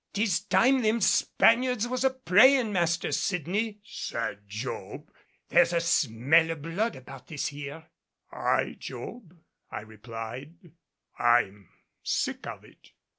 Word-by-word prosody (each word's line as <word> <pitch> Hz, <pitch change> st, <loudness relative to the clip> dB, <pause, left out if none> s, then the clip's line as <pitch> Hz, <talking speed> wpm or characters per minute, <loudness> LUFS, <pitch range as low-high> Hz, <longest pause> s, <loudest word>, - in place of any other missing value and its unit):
"'Tis 205 Hz, -3 st, +1 dB
time 260 Hz, +5 st, +4 dB
them 220 Hz, +1 st, +2 dB
Spaniards 240 Hz, +3 st, +3 dB
was 255 Hz, +1 st, -2 dB
a 265 Hz, -, +5 dB
praying, 255 Hz, -1 st, +4 dB
Master 170 Hz, -1 st, 0 dB
Sydney," 200 Hz, +5 st, -1 dB
said 105 Hz, -, -5 dB
Job; 110 Hz, +5 st, -6 dB, 0.4 s
"there's 175 Hz, 0 st, +4 dB
a 170 Hz, -, +3 dB
smell 160 Hz, +1 st, +3 dB
o' 165 Hz, -, -1 dB
blood 165 Hz, +9 st, -2 dB
about 130 Hz, 0 st, -12 dB
this 150 Hz, -3 st, -3 dB
here." 145 Hz, +2 st, -8 dB, 0.5 s
"Aye, -, -, 0 dB
Job," 185 Hz, -8 st, -9 dB, 0.3 s
I -, -, -5 dB
replied; 115 Hz, +6 st, -8 dB, 0.6 s
"I'm 105 Hz, -5 st, +2 dB, 0.3 s
sick -, -, -2 dB
of -, -, -8 dB
it." -, -, -21 dB
170 Hz, 125 wpm, -27 LUFS, -, 0.6 s, a